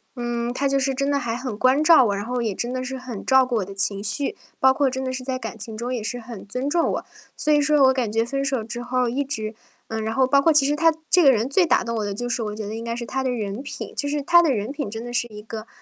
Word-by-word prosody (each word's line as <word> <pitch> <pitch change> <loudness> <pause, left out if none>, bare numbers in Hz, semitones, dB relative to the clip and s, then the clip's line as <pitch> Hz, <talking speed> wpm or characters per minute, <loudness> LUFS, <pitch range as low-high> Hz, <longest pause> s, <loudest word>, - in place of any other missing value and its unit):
嗯， 240 0 -2
他 280 +2 0
就 275 0 +2
是 270 0 0
真 275 +1 0
的 280 - +1
还 230 -3 -3
很 250 -2 -4
关 260 +6 +3
照 310 -5 +7
我， 200 -2 0
然 200 - -4
后 245 +1 -2
也 220 -4 -2
真 240 +5 -2
的 255 - -2
是 265 +1 -5
很 250 -5 -7
照 265 -1 +5
顾 250 - -2
我 195 - -1
的 195 - -10
情 200 0 +1
绪， 215 +7 -1 0.2
包 265 0 +5
括 275 -1 +2
真 260 +1 -4
的 260 - -2
是 255 0 -5
在 255 0 -2
感 230 -3 -7
情 220 +1 -6
中 240 +3 -3
也 240 - -2
是 245 +3 -3
很 225 -4 -10
尊 250 +7 -3
重 335 +2 +2
我。 - - -4 0.3
所 305 - 0
以 295 - +5
说 295 -1 +4
我 265 0 +6
感 250 -5 -1
觉 225 +1 +1
分 275 +3 -2
手 265 -4 -1
之 235 +2 -6
后 250 0 0
一 275 +4 -1
直 220 -6 -3 0.4
嗯， 220 0 -3
然 220 - -2
后 265 - +4
包 275 +2 +4
括 325 +3 +4
其 285 -3 +5
实 290 - +1
他 330 +1 +5 0.2
这 360 - +6
个 290 - +7
人 230 0 +1
最 340 +6 +3
打 - - +3
动 230 -1 -3
我 215 - -1
的 205 - -3
就 245 +5 -4
是 240 0 -1
我 210 -1 -4
觉 215 -1 -5
得 210 - -5
应 225 - -5
该 230 0 -3
是 235 - -5
他 265 +3 -2
的 260 - 0
人 215 -2 -3
品。 285 - -7
就 285 - -1
是 295 0 -1
他 345 +3 +6
的 325 -5 +2
人 215 +1 -2
品 285 -5 -4
真 225 +2 -6
的 240 - -6
是 240 -1 +1
一 210 -1 -10
个 220 +1 -8
250 Hz, 340 characters per minute, -23 LUFS, 225-275 Hz, 0.4 s, 照